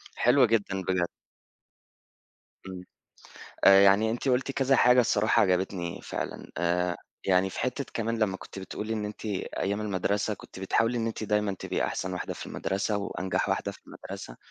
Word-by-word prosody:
حلوة 125 Hz, +1 st, +5 dB
جدًا 100 Hz, -4 st, 0 dB
بجد. 90 Hz, -2 st, +1 dB, 1.6 s
إمم. 90 Hz, -1 st, -7 dB, 0.8 s
آآ 95 Hz, 0 st, +9 dB
يعني 100 Hz, +3 st, +5 dB
أنتِ 120 Hz, +4 st, -2 dB
قُلتِ 130 Hz, +2 st, +1 dB
كذا 135 Hz, 0 st, +2 dB
حاجة 125 Hz, +1 st, +6 dB
الصراحة 110 Hz, -2 st, +3 dB
عجبتني 90 Hz, -2 st, 0 dB
فعلًا -, -, -5 dB
آآ 90 Hz, +1 st, +1 dB, 0.3 s
يعني 95 Hz, 0 st, +3 dB
في -, -, -8 dB
حتّة 130 Hz, +3 st, -1 dB
كمان 115 Hz, 0 st, -1 dB
لما 100 Hz, -4 st, +1 dB
كنتِ 95 Hz, -, -10 dB
بتقولي 105 Hz, +4 st, -5 dB
إن 105 Hz, -1 st, -2 dB
أنتِ 105 Hz, +2 st, -7 dB
أيام 100 Hz, 0 st, -2 dB
المدرسة 100 Hz, +1 st, 0 dB
كنتِ 95 Hz, -, -13 dB
بتحاولي 115 Hz, +5 st, +1 dB
إن 115 Hz, -, -1 dB
أنتِ 110 Hz, -1 st, -3 dB
دايمًا 105 Hz, -1 st, +1 dB
تبقي -, -, -2 dB
أحسن 90 Hz, -, -3 dB
واحدة 90 Hz, -, -4 dB
في -, -, -8 dB
المدرسة 100 Hz, +2 st, -1 dB
وأنجح 95 Hz, -1 st, -2 dB
واحدة -, -, -1 dB
في -, -, -15 dB
المدرسة -, -, -9 dB
100 Hz, 160 wpm, -28 LUFS, 95-115 Hz, 1.6 s, آآ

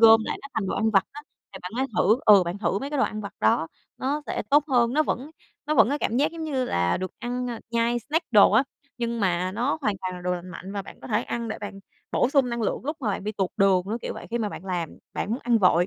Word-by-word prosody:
gom 225 Hz, 0 st, +8 dB
lại -, -, -3 dB
nó 280 Hz, -, -8 dB
thành 220 Hz, -3 st, -1 dB
đồ -, -, -1 dB
ăn 220 Hz, +1 st, +2 dB
vặt 195 Hz, -3 st, +4 dB
á, 295 Hz, -, -8 dB, 0.3 s
thì -, -, -8 dB
bạn 180 Hz, -, -6 dB
hãy 265 Hz, -, +1 dB
thử 215 Hz, +5 st, +4 dB
ừ, 205 Hz, -3 st, +8 dB
bạn 175 Hz, +3 st, -4 dB
thử 195 Hz, 0 st, 0 dB
mấy 280 Hz, +2 st, -5 dB
cái 295 Hz, -, -2 dB
đồ 270 Hz, -, +3 dB
ăn 215 Hz, 0 st, -3 dB
vặt 200 Hz, -3 st, -7 dB
đó 110 Hz, +9 st, +3 dB, 0.3 s
nó 285 Hz, +3 st, -1 dB
sẽ -, -, -2 dB
tốt 290 Hz, +1 st, +5 dB
hơn. 240 Hz, -3 st, +3 dB
Nó 310 Hz, -, +3 dB
vẫn 280 Hz, -1 st, -3 dB, 0.4 s
nó 305 Hz, -, +1 dB
vẫn -, -, +6 dB
có 290 Hz, +2 st, 0 dB
cảm 235 Hz, -, -1 dB
giác 290 Hz, +5 st, +2 dB
giống 330 Hz, -1 st, -6 dB
như 270 Hz, -5 st, -1 dB
là 85 Hz, -, +1 dB
được 185 Hz, 0 st, -4 dB
ăn, 245 Hz, +1 st, -3 dB
a, 230 Hz, -2 st, -6 dB
nhai 235 Hz, +1 st, +1 dB
snack 320 Hz, -2 st, -1 dB
đồ 205 Hz, -3 st, +7 dB
á, 225 Hz, +5 st, +6 dB, 0.4 s
nhưng 235 Hz, -1 st, -2 dB
mà 185 Hz, -1 st, +1 dB
nó 245 Hz, +9 st, 0 dB
hoàn 210 Hz, -8 st, 0 dB
toàn 185 Hz, -1 st, -4 dB
là 180 Hz, -, -8 dB
đồ 180 Hz, 0 st, 0 dB
lành 180 Hz, +1 st, -7 dB
mạnh 185 Hz, +2 st, -8 dB
và 200 Hz, -1 st, -3 dB
bạn -, -, -13 dB
có -, -, -9 dB
thể 220 Hz, 0 st, +1 dB
ăn 235 Hz, -2 st, -4 dB
để -, -, -4 dB
bạn 205 Hz, -1 st, -7 dB, 0.3 s
bổ -, -, +3 dB
sung 275 Hz, -3 st, +3 dB
năng 235 Hz, -1 st, -2 dB
lượng 215 Hz, -, -1 dB
lúc 300 Hz, +2 st, -2 dB
mà 235 Hz, -, -1 dB
bạn 195 Hz, -, -3 dB
bị 210 Hz, -, -2 dB
tụt 195 Hz, -3 st, -1 dB
đường, 195 Hz, -2 st, +4 dB
nó 215 Hz, +3 st, -2 dB
kiểu -, -, -4 dB
vậy. -, -, -8 dB
Khi 235 Hz, -, -1 dB
mà 215 Hz, -2 st, -1 dB
bạn 190 Hz, -, -8 dB
làm 175 Hz, -4 st, -3 dB
bạn -, -, -3 dB
muốn 235 Hz, -, 0 dB
ăn 235 Hz, -1 st, +3 dB
vội, 180 Hz, -3 st, +4 dB
225 Hz, 300 wpm, -25 LUFS, 190-255 Hz, 0.4 s, gom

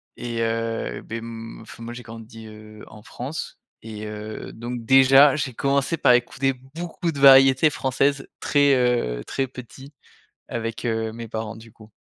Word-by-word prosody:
et 120 Hz, -1 st, -4 dB
heu, 115 Hz, 0 st, -2 dB
beh, 115 Hz, -, -6 dB
m 115 Hz, 0 st, -8 dB
enfin, 115 Hz, -, -12 dB
moi 120 Hz, +1 st, -7 dB
j'ai 125 Hz, -, -9 dB
grandi, 115 Hz, 0 st, -11 dB
heu, 110 Hz, 0 st, -13 dB
en 110 Hz, -, -14 dB
France. 135 Hz, +7 st, -7 dB, 0.3 s
Et 110 Hz, -1 st, -8 dB
heu, 105 Hz, 0 st, -7 dB
donc 120 Hz, 0 st, -6 dB
déjà, 135 Hz, +2 st, +6 dB
j'ai 135 Hz, -4 st, -3 dB
commencé 140 Hz, +6 st, 0 dB
par 125 Hz, -, +4 dB
écouter 135 Hz, +2 st, +1 dB, 0.2 s
beaucoup 170 Hz, 0 st, -3 dB
de 140 Hz, -, -7 dB
variétés 135 Hz, +2 st, +7 dB
françaises 140 Hz, +1 st, 0 dB
très, 145 Hz, -2 st, +3 dB
heu, 120 Hz, -, 0 dB
très 135 Hz, -, -2 dB
petit, 130 Hz, +2 st, -12 dB, 0.6 s
avec 115 Hz, 0 st, -4 dB
heu, 110 Hz, -1 st, -1 dB
mes 115 Hz, 0 st, -8 dB
parents 110 Hz, 0 st, -5 dB
du 115 Hz, 0 st, -14 dB
coup. 110 Hz, 0 st, -17 dB
120 Hz, 165 wpm, -23 LUFS, 115-135 Hz, 0.6 s, variétés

